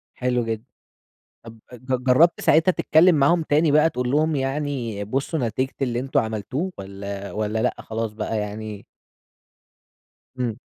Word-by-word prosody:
حلو 125 -1 0
جدًا. 115 -1 -3 0.8
طب 115 0 -11
ج 130 +1 -2
جرَّبت 150 +7 +4
ساعتها 160 +4 +4
تتكلم 170 +1 +4
معاهم 155 +4 +3
تاني 155 0 +2
بقى 155 +2 +5
تقول 125 -2 -2
لهم 155 +2 +2
يعني 135 -6 -2
بصّوا 135 +9 -2
نتيجة 130 +5 -2
اللي 120 -2 0
أنتم 135 +1 +1
عملتوه؟ 110 - -3
والّا 100 0 -7
والّا 110 +1 -1
لأ 125 - +1
خلاص 110 -1 -4
بقى 110 0 -3
يعني 105 0 -6 1.5
إمم. 120 -3 -2
125 Hz, 140 wpm, -23 LUFS, 110-145 Hz, 1.5 s, بقى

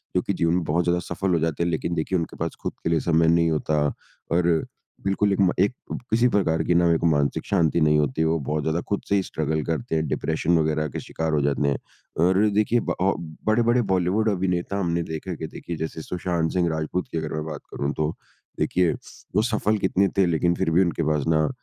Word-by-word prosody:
जो 90 - +3
कि 100 - -2
जीवन 85 -1 +1
में 90 - 0
बहुत 85 +4 +1
ज़्यादा 90 0 +2
सफ़ल 95 -2 0
हो 85 - +3
जाते 80 +1 0
हैं 85 - 0
लेकिन 85 +2 -2
देखिए 85 +3 0
उनके 80 - -5
पास - - -3
खुद - - -3
के - - 0
लिए 80 -1 +2
समय 80 0 +2
नहीं 85 0 +4
होता, 75 0 0 0.5
और 85 +1 +3 0.6
बिल्कुल 100 +1 +2
एक 100 - -2
म 90 - +4
एक 100 +6 +3 0.4
किसी 120 +2 +4
प्रकार 90 -7 +1
की 90 - +1
ना 85 0 +4 0.2
मानसिक 70 -1 0
शांति 85 -4 +2
नहीं 75 0 +4
होती। 75 +2 0
वो 80 +1 +2
बहुत 75 +2 -2
ज़्यादा 80 +2 0
खुद 100 - 0
से 100 - +3
ही 95 - +2
स्ट्रगल 80 -2 -2
करते 80 +3 -2
हैं, 80 0 0
डिप्रेशन 80 +1 0
वग़ैरह 75 0 0
के - - -5
शिकार 80 -1 -3
हो 75 - +2
जाते 70 0 +1
हैं। 70 - 0 0.5
और 95 +1 +3 0.2
देखिए 110 +3 +3
ब 85 - 0
अब 85 -5 -1
बड़े-बड़े 120 +2 +3
बॉलीवुड 95 +5 +2
अभिनेता 95 0 -1
हमने 85 -2 0
देखा 80 +3 -5
कि 80 +1 -5
देखिए 85 - -7
जैसे 80 0 -4
सुशांत 85 -1 -2
सिंह 90 -2 +2
राजपूत 80 +3 -2
की - - -2
अगर 80 -1 -4
मैं 75 0 -2
बात 75 -2 -6
करूँ 70 0 -2
तो, 75 +1 -1 0.4
देखिए 90 -3 +2 0.4
वो 105 - +5
सफ़ल 110 -2 +1
कितने 95 0 +2
थे 95 - +5
लेकिन 85 +1 +2
फिर 95 -4 0
भी 90 +4 +4
उनके 85 -2 0
पास 75 -2 +1
ना 80 -2 +3
85 Hz, 225 wpm, -24 LUFS, 80-95 Hz, 0.6 s, वो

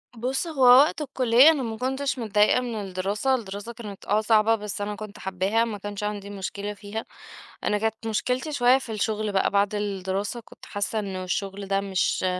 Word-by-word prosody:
بُص، 260 +8 -2
هو 305 -5 -4
وقت 265 +6 +7
الكلية 260 0 +5
أنا 290 -5 -1
ما 225 -2 -4
كُنتش 265 +2 -2
متضايقة 215 +2 +3
من 240 -2 -4
الدراسة، 200 +7 -1
الدراسة 205 0 -6
كانت 210 -4 -9
آه 210 +2 +2
صعبة 220 0 +4
بس 210 -1 -5
أنا 210 +1 -3
كُنت 210 0 -9
حابّاها، 190 +4 0
ما 220 -3 -4
كانش 205 0 -6
عندي 205 -1 -4
مشكلة 200 +1 -5
فيها. 205 +2 -6 0.6
أنا 210 - +1
كانت 220 +1 -2
مشكلتي 250 +7 -1
شوية 250 -1 +5
في 260 -4 -7
الشغل 215 0 -1
بقى 195 - +2
بعد 200 +1 +2
الدراسة، 200 +2 -2
كُنت - - -15
حاسة 205 +2 -2
إنه 190 -2 -4
الشغل 195 +2 -3
ده 195 0 +1
مش 190 -1 0
210 Hz, 185 wpm, -25 LUFS, 200-240 Hz, 0.6 s, وقت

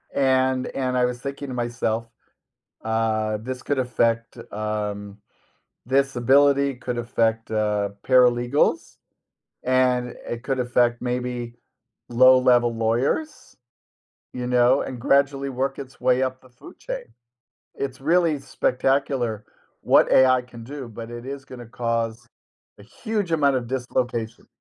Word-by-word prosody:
And 130 -1 +2
and, 130 -1 -2
I 125 - +3
was 125 0 -3
thinking 140 +2 -6
to - - -5
myself, 120 -2 -2 0.8
uh, 110 -1 0
"This 130 +1 -5
could 145 - -2
affect, 115 -2 0
um 105 -1 -4 0.7
this 135 +1 +1
ability 140 +2 +3
could 125 0 -4
affect, 115 -1 0
uh, 105 -2 0 0.2
paralegals 125 +1 +3 0.7
and 125 -1 +1
it 120 0 -5
could 135 0 -2
affect, 120 -1 +1
maybe, 125 -1 -3 0.5
low-level 125 -1 +5
lawyers, 120 - -1 0.8
you 125 -1 -4
know? 125 +2 +4
And 130 - -6
gradually 140 +1 +2
work 135 +1 -2
its 135 -1 -10
way 130 +1 +2
up 130 0 -2
the 130 - -19
food 120 - -15
chain." - - -6 0.7
It's 135 -1 -4
really 165 +1 +2
spectacular 130 -4 -1 0.4
what - - +4
AI 130 -1 +5
can 120 -2 -12
do, 135 0 -7
but 115 +1 -9
it 120 0 -8
is 135 0 -6
gonna 125 -3 -10
cause 115 -1 -3 0.5
a - - -13
huge 205 - -4
amount 145 -4 +3
of 120 -2 -3
dislocation. 120 -3 -3
125 Hz, 130 wpm, -23 LUFS, 115-135 Hz, 0.8 s, low-level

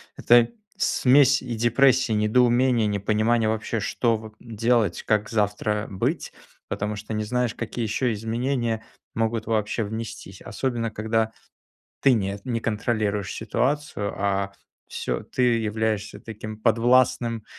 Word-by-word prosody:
это 120 0 +5 0.3
смесь 135 -4 +4
и 120 -3 -4
депрессии, 125 +2 +3
и - - +1
недоумения, 120 +2 +3
и - - +1
непонимания 110 +3 +1
вообще: 110 0 -2
что 115 +1 +1
в 110 0 -9
делать, 115 -4 0
как 105 -1 +1
завтра 105 0 0
быть. 95 - -2 0.4
Потому 105 +1 -2
что 105 +2 -7
не 110 0 -1
знаешь, 125 +1 -1
какие 115 +1 -4
еще 115 +2 0
изменения 115 +1 -2 0.3
могут 115 0 -1
вообще 110 0 0
внестись. 110 -2 -7
Особенно 115 +2 -2
когда 110 +1 0 0.7
ты 135 -2 +5
не 100 -2 -1
не 120 -2 -1
контролируешь 105 -3 -1
ситуацию, 125 -2 -1
а 100 0 -1 0.3
всё - - -3
ты 130 - -4 0.2
являешься 110 -1 -2
таким 110 -1 -8
подвластным, 120 0 +2
110 Hz, 130 wpm, -24 LUFS, 105-120 Hz, 0.7 s, это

